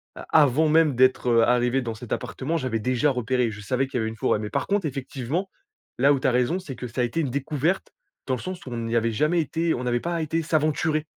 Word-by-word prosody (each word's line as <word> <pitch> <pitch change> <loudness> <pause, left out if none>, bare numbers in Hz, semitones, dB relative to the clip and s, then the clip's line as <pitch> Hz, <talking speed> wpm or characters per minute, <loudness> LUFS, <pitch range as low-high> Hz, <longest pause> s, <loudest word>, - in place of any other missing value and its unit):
a - - -8 0.2
avant 150 +3 +3
même 155 -3 +4
d'être, 130 0 +3
heu, 115 -1 +5
arrivé 125 +2 +2
dans 115 -2 -4
cet 115 +1 -11
appartement 130 +6 -2
j'avais 130 -7 -2
déjà 130 +5 +1
repéré. 125 -2 0
Je 100 - -9
savais 130 +5 -1
qu'il 135 - -4
y - - 0
avait 110 - -1
une 110 - -8
forêt. 105 - +1
Mais 105 - -4
par - - -1
contre 200 -3 0
effectivement 135 +6 -4 0.5
là 140 +3 +5
où 140 - 0
tu - - 0
as - - +3
raison 125 +9 +1
c'est 150 -8 -8
que 125 - -6
ça 120 +2 -3
a - - +3
été 120 +7 -1
une 145 -5 0
découverte 150 +7 -1 0.3
dans 130 - 0
le - - -7
sens 185 -3 -6
où 130 - -8
on 120 - -4
n'y 115 0 -2
avait 115 0 +2
jamais 150 +10 +1
été 165 +2 -1
on 125 - -3
n'avait 120 -1 0
pas 170 +4 -2
été 160 +1 -1
s'aventurer 155 -1 0
130 Hz, 265 wpm, -25 LUFS, 120-155 Hz, 0.5 s, heu